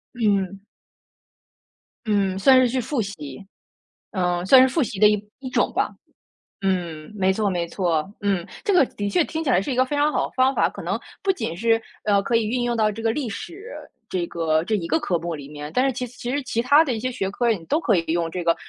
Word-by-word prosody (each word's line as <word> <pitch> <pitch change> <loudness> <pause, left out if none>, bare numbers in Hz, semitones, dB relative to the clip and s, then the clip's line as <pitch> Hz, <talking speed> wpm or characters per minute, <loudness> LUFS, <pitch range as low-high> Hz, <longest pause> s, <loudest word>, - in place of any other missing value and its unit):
嗯。 200 -4 0 1.5
嗯， 200 -3 +1
算 260 +4 +6
是 255 - +4
去 255 +2 -1
复 245 +1 -1
习。 170 -6 -7 0.7
嗯， 180 -2 0
算 255 +7 +8
是 260 - +6
复 305 +3 0
习 215 -5 -3
的 210 - +7
一 210 0 0
一 260 -1 -7
种 - - +1
吧。 - - +1 0.7
嗯， 175 -5 -2
没 190 -1 +2
错 205 0 0
没 175 -2 -1
错， 170 -3 0
嗯， 195 -4 0 0.2
这 415 - +1
个 315 -7 +6
的 205 -3 -4
确 335 - +3
听 320 +1 -4
起 275 - -1
来 185 - +4
是 270 - -4
一 - - -1
个 255 - +4
非 290 - -3
常 295 +1 +2
好 - - 0
的 - - -17
方 260 +1 +3
法， - - +3
可 - - -9
能 - - -2 0.2
不 390 - +3
仅 170 - -4
是， 225 +2 +2 0.2
呃， 200 -1 +3
可 235 - -1
以 230 -1 +2
运 245 +3 -1
用 240 0 0
到 215 -1 +2
这 220 +2 -7
个 225 0 +1
历 265 -1 -3
史 380 - -8 0.4
这 180 -2 -1
个 160 -2 0
这 220 - 0
一 185 -5 -2
个 325 - +2
科 180 - 0
目 170 0 -4
里 145 -2 -9
面， 150 0 -7
但 255 - +3
是 270 - +2
其 250 0 -4
其 245 0 -7
实 285 - 0
其 230 -2 -1
他 290 +6 +6
的 265 -6 -1
一 220 - -3
些 255 +2 -2
学 195 -6 -2
科 235 +3 +1
你 175 -7 -3
都 300 - +1
可 235 - +2
以 170 - +1
用 165 0 0
这 175 +1 -4
个 170 0 +3
215 Hz, 265 characters per minute, -23 LUFS, 180-255 Hz, 1.5 s, 算